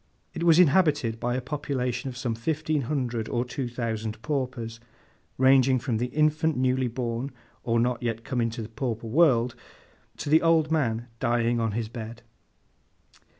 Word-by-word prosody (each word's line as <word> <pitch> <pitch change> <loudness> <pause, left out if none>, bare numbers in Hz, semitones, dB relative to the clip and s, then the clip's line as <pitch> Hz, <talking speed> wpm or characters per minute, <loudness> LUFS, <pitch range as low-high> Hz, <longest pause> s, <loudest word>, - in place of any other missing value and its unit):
It 165 - -5
was 165 -2 +6
inhabited 145 -9 +3
by 120 +1 -1
a 130 - -1
population 130 -2 -3
of 125 - -8
some 125 -3 -2
fifteen 155 +5 -1
hundred 120 -6 -2
or 120 0 0
two 130 0 -4
thousand 110 -3 -3
paupers, 125 -6 -3 0.6
ranging 130 0 +5
from 120 -2 -1
the 120 +3 -1
infant 155 +2 +1
newly 130 0 +1
born 120 +2 -3 0.3
or 115 -1 +1
not 120 0 0
yet 115 -2 -2
come 125 -1 -1
into 115 0 -2
the 105 - -8
pauper 115 0 -3
world, 125 -2 +3 0.6
to 145 - -4
the 160 - +6
old 165 -2 +3
man 120 -7 0
dying 120 -1 +1
on 115 -2 0
his 115 0 -2
bed. 115 0 -8
125 Hz, 160 wpm, -26 LUFS, 115-140 Hz, 0.6 s, was